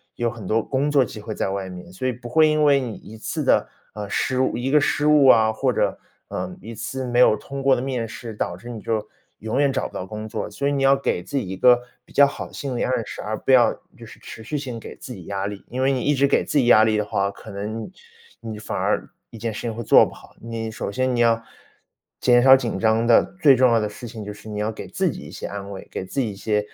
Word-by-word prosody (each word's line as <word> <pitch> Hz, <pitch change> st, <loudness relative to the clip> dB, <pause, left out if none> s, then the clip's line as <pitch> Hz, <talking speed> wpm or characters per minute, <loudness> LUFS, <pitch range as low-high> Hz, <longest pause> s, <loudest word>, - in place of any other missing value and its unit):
有 120 Hz, 0 st, 0 dB
很 110 Hz, -4 st, -8 dB
多 110 Hz, +2 st, +1 dB
工 140 Hz, +2 st, 0 dB
作 140 Hz, -2 st, +5 dB
机 110 Hz, -2 st, -7 dB
会 110 Hz, +1 st, -6 dB
在 -, -, -1 dB
外 95 Hz, -1 st, -3 dB
面， 90 Hz, -1 st, -10 dB
所 95 Hz, +8 st, -3 dB
以 130 Hz, -, 0 dB
不 120 Hz, +1 st, -10 dB
会 155 Hz, +4 st, +5 dB
因 155 Hz, 0 st, +2 dB
为 140 Hz, -2 st, +5 dB
你 120 Hz, -5 st, -4 dB
一 110 Hz, -, -12 dB
次 110 Hz, -, -3 dB
的， -, -, +3 dB, 0.3 s
呃， 105 Hz, -1 st, -5 dB
失 130 Hz, +4 st, 0 dB
误 130 Hz, -, +1 dB
一 125 Hz, +3 st, -2 dB
个 150 Hz, -, +6 dB
失 145 Hz, +1 st, +1 dB
误 150 Hz, -2 st, +6 dB
啊， 110 Hz, -3 st, +6 dB
或 -, -, 0 dB
者， -, -, 0 dB, 0.3 s
呃， -, -, -4 dB
一 115 Hz, +4 st, -8 dB
次 125 Hz, +4 st, -5 dB
没 120 Hz, 0 st, 0 dB
有 125 Hz, -, +6 dB
通 135 Hz, +6 st, -7 dB
过 135 Hz, -1 st, +4 dB
的 120 Hz, -, -2 dB
面 125 Hz, -4 st, -2 dB
试， 115 Hz, 0 st, -8 dB
导 90 Hz, -4 st, -3 dB
致 110 Hz, +7 st, -11 dB
你 115 Hz, -2 st, -6 dB
就 110 Hz, -2 st, -2 dB, 0.3 s
永 110 Hz, +5 st, -2 dB
远 140 Hz, -1 st, +3 dB
找 130 Hz, -, -1 dB
不 -, -, -19 dB
到 90 Hz, -, -5 dB
工 110 Hz, +2 st, -7 dB
作。 105 Hz, -, -4 dB
所 140 Hz, +7 st, -2 dB
以 -, -, +1 dB
你 140 Hz, -1 st, -1 dB
要 135 Hz, 0 st, +6 dB
给 135 Hz, -9 st, -1 dB
自 140 Hz, +9 st, -4 dB
己 125 Hz, -, -2 dB
一 95 Hz, +1 st, -5 dB
个 120 Hz, +3 st, +5 dB, 0.2 s
比 -, -, -20 dB
较 140 Hz, -, +7 dB
好 140 Hz, -, -6 dB
的 -, -, -19 dB
心 135 Hz, -3 st, -4 dB
理 -, -, 0 dB
暗 120 Hz, -4 st, 0 dB
示， -, -, -7 dB
而 110 Hz, +1 st, -3 dB
不 135 Hz, -, -1 dB
要 125 Hz, -2 st, +6 dB, 0.3 s
就 -, -, -11 dB
是 -, -, -14 dB
持 110 Hz, -, -10 dB
续 150 Hz, -, -3 dB
性 130 Hz, -5 st, -5 dB
给 -, -, -10 dB
自 125 Hz, -, -9 dB
己 95 Hz, -6 st, -11 dB
压 100 Hz, -1 st, -3 dB
力。 100 Hz, -1 st, -7 dB
因 130 Hz, +2 st, -3 dB
为 135 Hz, -, +3 dB
你 130 Hz, -2 st, 0 dB
一 145 Hz, -, +2 dB
直 140 Hz, +1 st, +3 dB
给 -, -, +2 dB
自 -, -, -1 dB
己 135 Hz, -, +4 dB
压 110 Hz, -2 st, +7 dB
力 110 Hz, -1 st, +2 dB
的 105 Hz, -, 0 dB
话， 100 Hz, -1 st, 0 dB
可 110 Hz, -, -12 dB
能 110 Hz, -, -5 dB, 0.5 s
你 110 Hz, -1 st, -7 dB
反 -, -, -5 dB
而 -, -, 0 dB, 0.2 s
一 115 Hz, -, -11 dB
件 115 Hz, 0 st, -3 dB
事 -, -, -6 dB
情 115 Hz, -2 st, -4 dB
会 120 Hz, -, -5 dB
做 -, -, +7 dB
不 -, -, -9 dB
好。 -, -, -17 dB
你 115 Hz, -1 st, -5 dB
首 105 Hz, -, -4 dB
先， 130 Hz, +3 st, 0 dB
你 -, -, -1 dB
要 115 Hz, -1 st, +3 dB, 0.8 s
减 120 Hz, -1 st, +5 dB
少 130 Hz, 0 st, +9 dB
紧 125 Hz, -3 st, -2 dB
张 110 Hz, +1 st, +2 dB
的 120 Hz, -, +6 dB, 0.2 s
最 140 Hz, -3 st, +7 dB
重 125 Hz, -1 st, +4 dB
要 115 Hz, -, +4 dB
的 105 Hz, -1 st, -1 dB
事 120 Hz, +3 st, -9 dB
情 110 Hz, -1 st, -8 dB
就 105 Hz, -, -6 dB
是 105 Hz, -, -14 dB
你 105 Hz, -, -4 dB
要 105 Hz, +1 st, -1 dB
给 -, -, -8 dB
自 -, -, 0 dB
己 -, -, -6 dB
一 -, -, -10 dB
些 -, -, -6 dB
安 100 Hz, -1 st, -7 dB
慰， 95 Hz, -, -9 dB
给 95 Hz, -, -4 dB
自 115 Hz, -, -4 dB
己 120 Hz, -, -1 dB
一 -, -, -10 dB
些 105 Hz, +2 st, 0 dB
115 Hz, 310 characters per minute, -23 LUFS, 105-130 Hz, 0.8 s, 少